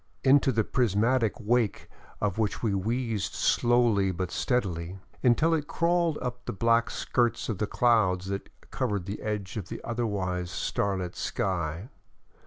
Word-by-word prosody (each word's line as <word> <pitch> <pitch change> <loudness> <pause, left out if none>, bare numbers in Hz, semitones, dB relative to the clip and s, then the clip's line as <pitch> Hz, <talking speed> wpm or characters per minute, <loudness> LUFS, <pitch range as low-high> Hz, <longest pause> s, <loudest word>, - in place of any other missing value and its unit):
Into 135 0 +5
the 115 -2 +1
prismatic 115 0 +1
wake 115 -1 0 0.3
of 105 0 -1
which 110 +1 -1
we 110 -3 +1
wheezed 110 +1 -1
slowly 120 -5 +3
but 90 0 -3
steadily, 95 -7 -1 0.2
until 145 +7 +4
it 150 -2 0
crawled 170 -2 +1
up 125 -1 -3
under - - -35
the - - -2
black 115 +3 +2
skirts 120 -2 0
of 110 - -2
the 105 - 0
clouds 100 -6 +2
that 100 0 -4 0.2
covered 100 -4 -1
the 100 +2 -5
edges 105 -2 -3
of - - -18
an - - -6
otherwise 100 -7 -2
starlit 95 -2 -2
sky. 85 - -2
110 Hz, 150 wpm, -28 LUFS, 95-120 Hz, 0.3 s, Into